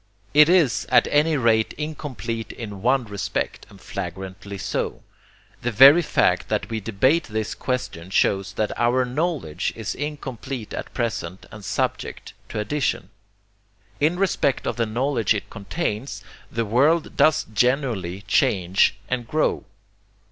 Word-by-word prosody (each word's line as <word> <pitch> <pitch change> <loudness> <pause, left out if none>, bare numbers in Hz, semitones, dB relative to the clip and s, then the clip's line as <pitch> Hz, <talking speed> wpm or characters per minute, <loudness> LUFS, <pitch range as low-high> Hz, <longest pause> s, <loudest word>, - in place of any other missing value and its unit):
It 150 +2 +7
IS 130 - +3
at 125 - +5
any 150 +1 +3
rate 110 -3 +2
incomplete 135 -7 -5
in 105 -4 -8
one 125 +2 +2
respect, 100 -4 -3
and - - -15
flagrantly 95 +1 -6
so. - - -3 0.6
The 120 - -1
very 135 +9 +8
fact 90 - +1
that 105 +1 -1
we 110 - -1
debate 120 - +2
this 110 0 -3
question 125 -9 -4
shows 95 0 +1
that 105 +1 -1
our 125 +2 +3
KNOWLEDGE 140 - -2
is - - -4
incomplete 135 -5 -5
at - - -5
present 95 -7 -3
and 105 0 -10
subject - - -3 0.2
to - - -5
addition. 105 -3 -1 0.9
In 160 +4 +2
respect 180 -8 +1
of - - -1
the 115 -2 0
knowledge 120 -1 +1
it 105 - -5
contains 115 - -4 0.3
the 115 0 -1
world 145 +10 +2
does 155 -1 +4
genuinely 110 -7 0
change 95 -8 +2
and 120 -2 -2
grow. 155 +4 0
120 Hz, 135 wpm, -23 LUFS, 105-140 Hz, 0.9 s, very